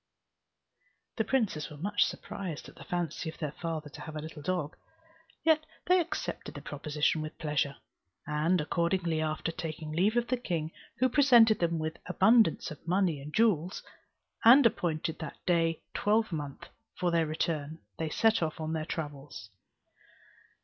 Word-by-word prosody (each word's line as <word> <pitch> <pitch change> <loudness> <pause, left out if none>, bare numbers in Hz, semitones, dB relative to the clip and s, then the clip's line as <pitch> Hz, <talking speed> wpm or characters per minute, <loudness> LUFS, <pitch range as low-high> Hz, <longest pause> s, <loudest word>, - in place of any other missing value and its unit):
The 220 - +2
princes 215 - 0
were 150 - -10
much 205 +7 +2
surprised 180 -7 -6
at - - -12
the - - -11
fancy 175 -2 -3
of 160 - -10
their 150 -4 -3
father 160 -1 -4
to - - -10
have 155 -2 -8
a - - -3
little 155 -1 -8
dog, 160 -2 -2 0.7
yet 315 -1 +4 0.2
they 365 +1 +5
accepted 340 - -4
the - - -7
proposition 150 +1 -1
with 155 0 -6
pleasure: 150 -2 -1 0.5
and 155 +4 +1
accordingly, 170 +1 0
after 155 +1 -1
taking 155 -2 -5
leave 195 +9 +2
of 240 - +2
the 255 - +1
king, 165 -9 -3 0.3
who 255 - +4
presented 240 -5 +6
them 170 -1 +1
with 155 0 -3
abundance 215 0 +4
of 155 +2 -11
money 175 -5 +1
and 145 +2 -8
jewels, 190 -6 +2 0.6
and 250 +4 +8
appointed 175 -8 0
that - - -6
day 165 -2 +1
twelvemonth 195 -10 -1 0.3
for 180 -2 0
their 165 -1 +2
return, 155 -1 -2 0.2
they 160 -1 -1
set 225 +6 +3
off 160 -1 -2
on 160 0 -3
their 155 -1 -2
travels. 145 - -6
165 Hz, 155 wpm, -30 LUFS, 155-205 Hz, 0.7 s, and